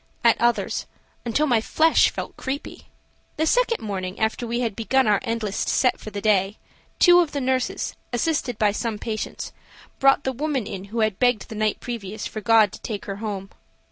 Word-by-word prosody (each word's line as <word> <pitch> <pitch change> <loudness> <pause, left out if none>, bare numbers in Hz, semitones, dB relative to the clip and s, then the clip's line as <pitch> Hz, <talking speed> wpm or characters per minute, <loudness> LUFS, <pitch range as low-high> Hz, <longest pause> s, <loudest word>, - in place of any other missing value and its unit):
at 235 -1 +6
others 240 0 +1 0.4
until 240 +6 +1
my 240 -6 +3
flesh 320 +8 +4
felt - - -6
creepy. 270 +2 -6 0.5
The 315 - +1
second 475 +6 +2
morning, 190 -2 -4
after 220 +2 -1
we 235 +1 -1
had 230 -5 -1
begun 265 +4 +2
our 210 -2 +3
endless 225 -4 -3
"set" 255 - +1
for - - -8
the 205 -1 -5
day, 200 -1 +2 0.4
two 350 -1 +7
of 335 -4 +1
the 285 - -1
nurses, 260 -1 -1 0.2
assisted 250 -2 -1
by 210 -2 +3
some 220 +1 -3
patients, 215 0 -5 0.5
brought 275 +1 +4
the 265 - -1
woman 275 -3 -1
in 190 0 -6
who 225 +3 -3
had 215 -3 0
begged 245 -5 +2
the - - -6
night 215 0 0
previous 215 -3 -5
for 215 - -5
God 220 -2 +5
to - - -11
take 210 -3 -5
her 195 -1 -5
home. 200 -3 -5
230 Hz, 190 wpm, -23 LUFS, 210-260 Hz, 0.5 s, two